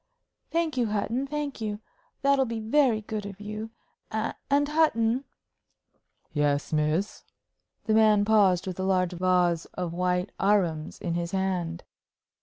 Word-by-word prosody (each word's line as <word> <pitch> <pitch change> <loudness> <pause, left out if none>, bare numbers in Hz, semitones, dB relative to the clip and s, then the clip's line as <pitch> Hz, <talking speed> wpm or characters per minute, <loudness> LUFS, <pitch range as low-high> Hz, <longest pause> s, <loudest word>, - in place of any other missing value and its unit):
"Thank 330 -4 -1
you, 240 -2 +2
Hutton 220 +6 -1
thank 290 -3 -4
you. 210 -1 -3 0.4
That'll 275 -1 +3
be 230 -1 -3
very 225 0 +2
good 215 0 -4
of 195 -1 -9
you. 215 +1 -6 0.4
And, 275 +6 -1
Hutton 265 -5 +2 0.5
" - - -47 0.3
"Yes, 145 0 0
miss." 155 +6 0 0.6
The 220 - +1
man 215 -2 +5
paused 200 -5 +4
with 185 -1 -5
a - - -1
large 185 -2 +1
vase 180 -2 +2
of 180 -2 -3
white 180 +1 0
arums 180 -6 +1
in 170 - -3
his 170 +1 -3
hand. 180 -3 -1
205 Hz, 140 wpm, -27 LUFS, 180-230 Hz, 0.6 s, man